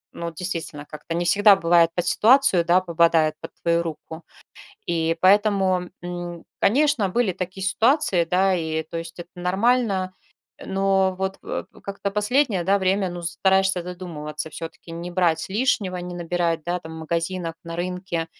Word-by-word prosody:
ну, 170 0 -4
действительно, 165 -3 -4
как-то 150 +2 -7
не 175 +1 -1
всегда 205 +3 +6
бывает 170 -2 +4
под 175 - 0
ситуацию, 250 -6 +4
да, 175 +2 +3
попадает 165 -3 +2
под - - -7
твою 170 0 +2
руку. 160 0 -7 0.6
И 165 -1 0
поэтому, 190 -2 +3
м, 175 -1 -6 0.2
конечно, 270 -2 +2
были 225 +2 +1
такие 185 +1 -5
ситуации, 220 - +2
да, 190 +3 +2
и, 160 -3 -1
то 160 - -9
есть, 165 +1 -8
это 175 - -9
нормально, 190 +1 +1 0.5
э. - - -11
Но 195 -1 +1
вот, 190 +1 -3
э, - - -4 0.2
как-то 200 0 -4
последнее, 210 -1 +1
да, 195 +2 +2
время, 190 0 +1
ну, 175 0 -7
стараешься 190 +2 +2
задумываться, 160 -4 -6
всё-таки 165 +1 -9
не 170 +1 -6
брать 165 -2 +1
лишнего, 200 -4 0
не 180 0 -6
набирать, 170 -2 -1
да, 175 +1 -2
там 160 -1 -10
в 160 - -8
магазинах, 170 +1 -3
на 165 -1 -7
рынке. 180 -1 -3
180 Hz, 160 wpm, -23 LUFS, 170-195 Hz, 0.6 s, всегда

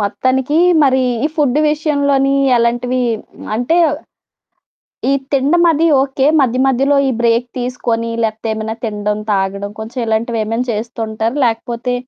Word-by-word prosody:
మొత్తానికి 260 +7 0 0.3
మరి 265 -1 +3 0.2
ఈ - - +4
ఫుడ్ 290 -3 +2
విషయంలోని 285 -3 +1 0.2
ఎలాంటివి 240 +2 0 0.5
అంటే 245 +9 0 1.3
ఈ - - +3 0.2
తినడం 285 +6 +2
అది 320 +2 +1 0.2
ఓకే. 270 0 0
మధ్య 255 -2 +1
మధ్యలో 270 +2 +2
ఈ - - +1
బ్రేక్ 235 +1 +2
తీసుకొని 235 -2 -2
లేకపోతే 220 +1 -3
ఏమైనా 220 0 -4
తినడం, 210 -1 -2
తాగడం 200 +1 -2
కొంచెం 225 +4 -7
ఇలాంటివి 225 +1 -1
ఏమైనా 225 +3 -2
చేస్తూంటారా? 225 +1 -3
లేకపోతే 235 +2 -2
240 Hz, 125 wpm, -16 LUFS, 225-270 Hz, 1.3 s, ఈ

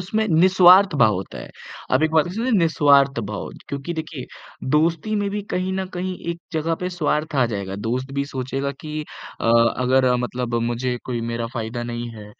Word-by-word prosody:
इसमें 215 +4 -1
निस्वार्थ 185 +2 +6
भाव 110 -4 +5
होता 95 +1 -6
है। - - -9 0.4
आप - - +3
एक 160 - +2
बात 160 -1 +3
इसमें 225 +8 -2
निस्वार्थ 145 - +4
भाव 105 -1 -5 0.2
क्योंकि 140 +4 -4
देखिए 155 -5 -6 0.5
दोस्ती 165 +6 +1
में 205 -1 0
भी 205 0 -3
कहीं 185 +1 -1
न 190 0 -2
कहीं 185 +1 -3
एक 170 - -6
जगह 160 +1 0
पे 180 - -1
स्वार्थ 155 -2 -1
आ 130 - +4
जाएगा। 100 -4 -4
दोस्त 130 +3 -2
भी 140 0 -1
सोचेगा 135 0 -3
कि 155 0 -5 0.4
अ, - - -4 0.3
अगर 130 +1 +2
अ, 125 -1 +3
मतलब 125 -1 -3
मुझे 120 +1 -1
कोई 120 -2 -3
मेरा 115 0 -2
फायदा 120 +1 -4
नहीं 120 0 -4
है, 105 -1 -10
145 Hz, 190 wpm, -22 LUFS, 125-175 Hz, 0.5 s, निस्वार्थ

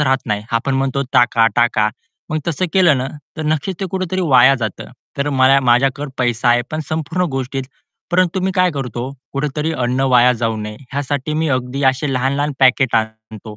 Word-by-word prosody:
राहत 135 -2 +2
नाही. 105 -2 -1
आपण 125 +4 0
म्हणतो 135 0 0
"टाका, 115 -2 +4
टाका." 115 -3 +3 0.4
मग 155 - 0
तसं 170 +3 -1
केलं 175 -7 +4
ना 130 - -2 0.3
तर 160 - -4
नक्कीच 155 +4 -1
ते 195 - -1
कुठेतरी 185 -1 -2
वाया 130 -2 +6
जातं. 110 -6 -5 0.3
तर 140 +1 0
मला 135 0 +4
माझ्याकडे 135 +3 +1
पैसा 120 -1 0
आहे 120 0 +4
पण 155 - -3
संपूर्ण 160 +3 -1
गोष्टीत. 135 0 -3 0.5
परंतु 185 +1 +1
मी 190 +1 0
काय 185 -1 +3
करतो 125 -2 -4 0.2
कुठेतरी 150 +3 -2
अन्न 125 -3 -1
वाया 125 0 +6
जाऊ 115 -2 -2
नये 105 0 -6 0.2
ह्यासाठी 145 +1 -2
मी 160 0 0
अगदी 130 +2 -4
अशी 130 +2 +2
ते 135 - -2
लहान-लहान 140 +3 0
पॅकेट 130 -1 +4
आणतो. 110 -1 -4
135 Hz, 180 wpm, -18 LUFS, 120-150 Hz, 0.5 s, वाया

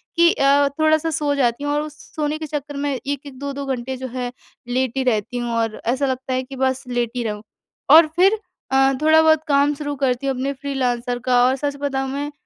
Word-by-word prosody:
कि 340 0 +5
अ, 280 +1 +4
थोड़ा-सा 315 +1 +3
सो 290 -1 0
जाती 250 0 0
हूँ 290 0 -1
और 295 - +1
उस 305 0 -8 0.2
सोने 300 0 -1
के 315 - -5
चक्कर 290 -1 -5
में 285 0 -1
1-1, 280 0 -5
2-2 280 0 -4
घंटे 260 0 -3
जो 260 0 -5
है 245 -1 -3 0.4
लेटी 260 +1 0
रहती 245 0 0
हूँ 240 -1 -3
और 225 -1 -2
ऐसा 260 +4 +1
लगता 260 0 -2
है 255 0 0
कि 270 +1 -10
बस 260 0 0
लेटी 240 0 -2
रहुँ। 210 -1 -4 0.5
और 320 +1 +9
फिर 390 +4 +4 0.3
अ, 270 0 +4
थोड़ा 315 +1 +6
बहुत 315 -1 +4
काम 285 0 +3
शुरू 290 0 -4
करती 265 0 -1
हूँ 270 - 0
अपने 275 +2 -2
फ्रीलांसर 250 -3 -2
का 245 -1 +4
और 260 +1 +3
सच 285 +1 -3
बताऊँ 270 -2 -1
मैं 290 +1 -3
275 Hz, 210 wpm, -21 LUFS, 255-290 Hz, 0.5 s, और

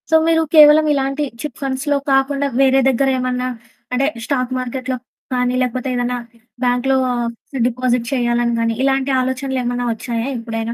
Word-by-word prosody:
So, 320 - +4
మీరు 325 0 +3
కేవలం 305 0 +8
ఇలాంటి 275 +1 -1 0.2
చిట్ 300 -5 -6
ఫండ్స్‌లో 275 +2 -1
కాకుండా 275 +1 +2
వేరే 270 0 +4
దగ్గర 270 +1 +2
ఏమన్నా 250 0 -1 0.5
అంటే 265 +2 +2 0.2
స్టాక్ 255 -2 -1
మార్కెట్‌లో 255 +1 -3 0.4
కానీ 250 0 +1
లేకపోతే 255 +1 -2
ఏదైనా 245 0 -1 0.5
బాంక్‌లో 250 +2 +2 0.7
డిపాజిట్ 250 -1 -1
చేయాలని 240 -1 +1
కానీ 230 0 +1
ఇలాంటి 270 0 +1
ఆలోచనలేమన్నా 255 -1 -2
వచ్చాయా 230 +1 -4
ఎప్పుడైనా? 230 0 -4
255 Hz, 135 wpm, -18 LUFS, 245-270 Hz, 0.7 s, కేవలం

